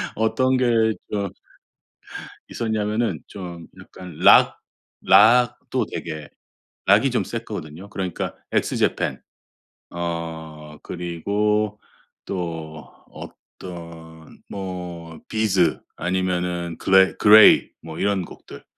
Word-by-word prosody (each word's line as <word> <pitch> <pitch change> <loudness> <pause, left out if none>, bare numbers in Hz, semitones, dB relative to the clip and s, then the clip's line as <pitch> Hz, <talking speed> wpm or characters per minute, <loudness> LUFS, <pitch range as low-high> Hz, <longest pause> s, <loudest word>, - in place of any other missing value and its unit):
어떤 130 +4 +1
게 115 -3 +2 0.2
저 100 -2 -2 1.2
있었냐면은 110 0 -2
좀 85 -4 -9
약간 90 -4 -12
락 - - +6 0.4
락도 120 +3 +4
되게 80 -3 -6 0.6
락이 - - +4
좀 - - 0
셌거든요. 80 +6 -7
그러니까 95 -3 -4 0.2
X - - 0
japan - - 0 0.7
어 80 -3 -6
그리고 105 +5 -1 0.5
또 80 -4 -5 0.2
어떤 85 -3 -12
뭐 90 -4 -7
비즈 95 -7 +1 0.2
아니면은 90 -1 -2
그레 95 0 +4
그레이 105 0 +7
뭐 80 0 -9
이런 100 -2 0
곡들 - - -13
90 Hz, 185 characters per minute, -22 LUFS, 85-105 Hz, 1.2 s, 그레이